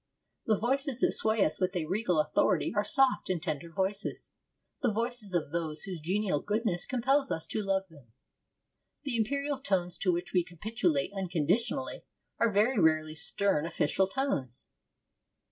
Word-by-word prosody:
The 215 -2 +3
voices 265 +3 0
that - - +4
sway 220 -2 +2
us 155 - -1
with 185 +1 0
a 170 -3 -1
regal 185 -1 0
authority 155 +4 +2
are 205 - +2
soft 265 +5 +3
and 185 -2 0
tender 160 -1 -4
voices, 195 +3 -3 0.5
the 245 -5 +2
voices 230 -3 -2
of 155 -4 -1
those 160 -2 -1
whose 185 -3 -5
genial 185 -2 0
goodness 210 -4 -1
compels 270 +2 +1
us 160 - -2
to 215 - -2
love 195 -1 0
them. 145 -8 -18 1.0
The 275 -5 -2
imperial 280 +5 -1
tones 185 -10 -1
to 185 - +2
which 175 +2 -3
we 180 -2 +3
capitulate 180 -3 -1
unconditionally 195 - -1 0.4
are 230 - +3
very 215 +4 +3
rarely 155 -1 +3
stern 160 +1 +2
official 170 +4 +1
tones. 165 - -2
195 Hz, 155 wpm, -30 LUFS, 170-230 Hz, 1.0 s, that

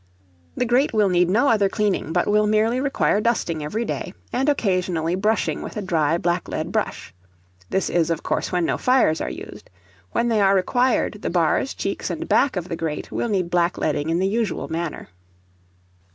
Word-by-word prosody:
The 250 - +1
grate 245 +4 +2
will 210 -3 +3
need 180 -1 +3
no 235 +9 +3
other 205 -3 +3
cleaning, 205 -7 -1
but 175 +1 +1
will 210 0 +3
merely 220 +4 +2
require 275 -6 +1
dusting 175 -9 0
every 215 +10 -2
day, 190 - -4 0.2
and 265 +4 +1
occasionally 185 - 0
brushing 210 +4 0
with - - -7
a - - -2
dry 165 -3 +1
black 175 +1 -1
lead - - -4
brush. - - -3 0.6
This 190 - 0
is, 170 -2 +1
of 165 -1 -2
course, - - -1
when 180 -2 +1
no - - -1
fires 250 -11 +3
are - - -2
used. 65 - -9 0.4
When 235 - +1
they 225 -3 +2
are 195 0 +4
required, 245 +7 +1
the - - -2
bars, - - +1
cheeks, - - -3
and - - -4
back 280 - +3
of 180 -2 -3
the 170 - -3
grate 160 -2 -4
will 235 - -2
need 185 -4 -1
black 175 0 +1
leading 150 0 -1
in 165 - +1
the 185 - +1
usual 220 0 -1
manner. 165 0 -4
190 Hz, 195 wpm, -22 LUFS, 170-225 Hz, 0.6 s, are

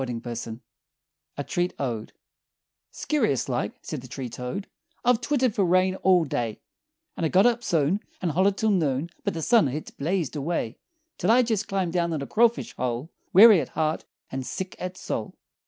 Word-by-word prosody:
[Illustration: 120 -1 -5 0.8
A 145 - -2
Treat 175 +4 -1
Ode] 115 -5 -3 0.8
"Scurious 220 - 0
like," 120 -5 -1
said 150 -5 -5
the 130 - -11
treetoad, 125 - -5 0.4
"I've 245 -1 +4
twittered 255 -3 +1
fer 205 - +1
rain 185 +1 +3
all 180 -4 +4
day; 115 -6 -2 0.6
And - - -4
I 160 - +2
got 190 +6 +5
up 240 0 +2
soon, 165 0 +1 0.2
And 175 -3 -1
hollered 190 +5 +2
till 220 -1 +2
noon 155 -3 0
But 200 -4 -1
the 165 - -3
sun 230 - +5
hit 145 +4 -5
blazed 165 0 -1
away, 145 -6 -2 0.4
Till 180 - 0
I 245 +3 +6
jest 220 -3 -1
clumb 190 -3 -1
down 170 -1 0
in 155 - -2
a - - -4
crawfish 235 - +2
hole 125 +5 -2 0.2
Weary 205 -2 +9
at 130 - -6
heart, 155 0 -1 0.3
and 130 0 -3
sick 185 +7 -5
at 180 0 -5
soul! - - -4
170 Hz, 175 wpm, -26 LUFS, 135-195 Hz, 0.8 s, Weary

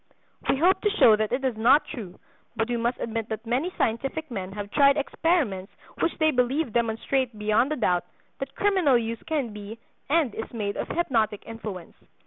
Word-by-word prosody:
We - - +3
hope 360 +6 +3
to 420 - +2
show 240 - +6
that 215 0 -1
it 265 +2 -1
is 255 -3 0
not 250 +7 +5
true; 205 -10 -8 0.4
but 225 - 0
we 240 - -1
must 235 +1 0
admit 225 -1 -3
that 220 +1 -5
many 260 +10 0
scientific 270 +6 -1
men 190 -4 -4
have 205 0 -6
tried 280 0 +5
experiments 285 - 0 0.3
which - - 0
they 315 -1 +3
believe 255 0 0
demonstrate 235 +1 0
beyond 215 +6 +2
a - - +1
doubt 180 - +1 0.3
that 270 0 -6
criminal 375 -10 +3
use 230 -1 -3
can 280 -9 -1
be 210 +2 -8 0.3
and 300 -7 +2
is 225 - -6
made 205 -3 -2
of - - -3
hypnotic 225 -11 0
influence. 215 -6 -7
235 Hz, 185 wpm, -26 LUFS, 215-285 Hz, 0.4 s, show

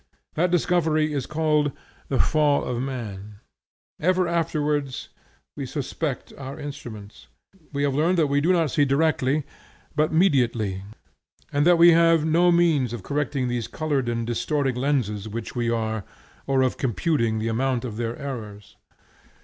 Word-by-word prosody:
That 175 +3 +1
discovery 160 -3 +1
is 135 -3 -2
called 150 -2 +1 0.4
the 135 - 0
Fall 150 -1 +3
of 125 -1 -2
Man. 105 -6 -6 0.6
Ever 185 +2 +2
afterwards 150 -5 -1 0.5
we 140 -2 -5
suspect 140 +1 -4
our 135 0 -7
instruments. 110 -8 -9 0.4
We 140 -1 -1
have 140 -1 +1
learned 165 +6 +2
that 160 - +4
we 140 0 +1
do 170 +5 +3
not 165 -6 +2
see 145 - +3
directly, 145 0 +1 0.5
but 155 +1 +2
mediately, 120 - +2 0.7
and 145 +3 +3
that 175 -1 +6
we 170 +1 +8
have 165 -1 +4
no 170 +3 +4
means 160 -8 +3
of 115 -6 -6
correcting 140 -1 -1
these 120 -2 -2
colored 145 -6 -1
and 115 -1 -2
distorting 135 +3 0
lenses 120 -6 -1
which 115 +1 -6
we 120 -1 0
are, 110 -2 -1 0.4
or 135 -1 +3
of 130 - 0
computing 120 - 0
the 110 +1 -1
amount 125 +1 0
of 110 -3 -6
their 115 0 -3
errors. 110 -8 -7
140 Hz, 150 wpm, -24 LUFS, 120-155 Hz, 0.7 s, we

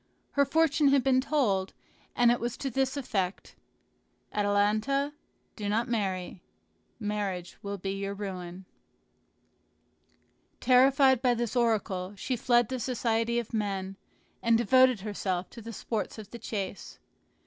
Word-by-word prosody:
Her 280 0 +3
fortune 305 0 +3
had 275 -2 +4
been 260 -1 +3
told, 210 -10 0 0.4
and 240 -1 +5
it 240 - +1
was 240 0 -3
to 270 - -3
this 265 +2 0
effect: 195 -8 -3 0.8
"Atalanta, 210 +8 +1 0.4
do 205 -2 -4
not 225 +4 +1
marry; 190 -6 -2 0.6
marriage 205 -4 -3
will 200 0 -4
be 195 +1 -4
your 195 0 -3
ruin." 185 -2 -6 1.9
Terrified 265 0 +5
by 250 -2 +3
this 235 0 -2
oracle, 205 -5 0
she 250 +6 -2
fled 240 -1 +3
the 260 -1 -3
society 235 -1 0
of 235 -2 -3
men, 195 -3 -2 0.5
and 230 -1 +4
devoted 255 -2 +4
herself 190 -3 -3
to 235 - -10
the 230 +1 -7
sports 220 0 -4
of 215 -2 -10
the 235 - -8
chase. 200 -4 -5
225 Hz, 135 wpm, -29 LUFS, 200-255 Hz, 1.9 s, and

